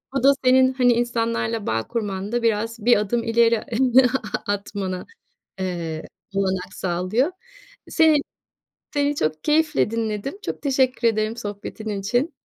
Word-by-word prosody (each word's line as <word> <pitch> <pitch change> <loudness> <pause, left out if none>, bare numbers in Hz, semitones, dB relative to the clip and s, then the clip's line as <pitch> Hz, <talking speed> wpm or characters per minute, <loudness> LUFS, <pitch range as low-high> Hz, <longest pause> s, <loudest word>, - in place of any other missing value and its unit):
O 270 - 0
da, 275 - +8
senin, 260 +1 +5
hani, 250 -2 +4
insanlarla 230 -2 -1
bağ 110 0 -1
kurmanda, 210 +1 -2
biraz, 225 0 -1
bir 245 - +6
adım 220 +3 0
ileri 230 -1 +3 0.8
atmana 200 -2 -3 0.5
eee, 170 -4 -3 0.3
olanak 190 -1 -1
sağlıyor. 185 - 0 0.6
Seni 320 -2 +5 0.8
seni 290 0 +1
çok 155 - -2
keyifle 305 -6 +2
dinledim. 230 - -3
Çok - - -5
teşekkür 260 -4 +2
ederim 215 +1 -1
sohbetin 210 0 -6
için. 240 - -1
230 Hz, 120 wpm, -23 LUFS, 200-255 Hz, 0.8 s, da